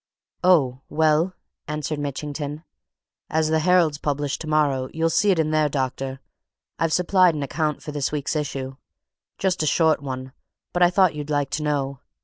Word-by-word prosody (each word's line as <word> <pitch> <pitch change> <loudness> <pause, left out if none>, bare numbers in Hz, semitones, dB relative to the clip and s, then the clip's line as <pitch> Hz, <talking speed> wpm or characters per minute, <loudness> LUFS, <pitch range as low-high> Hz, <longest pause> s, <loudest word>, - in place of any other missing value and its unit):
"Oh, 140 -8 +3
well!" 160 +4 +2 0.3
answered 150 0 -3
Mitchington. 145 +1 -4 0.7
"As 160 0 +1
the 160 0 +2
Herald's 165 -3 +3
published 145 -1 -2
tomorrow 150 -4 +1
you'll 165 +1 0
see 205 +5 +3
it 190 - +4
in 155 -1 +1
there, 155 -1 +2
doctor 135 -1 -3 0.6
I've 165 -1 +1
supplied 180 0 +4
an 145 - -2
account 150 +2 -2
for 150 - -6
this 145 -2 -2
week's 150 0 -2
issue; 135 -3 -3 0.6
just 185 -3 0
a 155 - 0
short 160 -1 +3
one 130 -1 -5 0.4
but 175 - -1
I 175 - +7
thought 185 -1 +3
you'd 150 0 -6
like 145 -2 0
to 155 - -2
know. 140 -3 -1
150 Hz, 165 wpm, -23 LUFS, 140-160 Hz, 0.7 s, I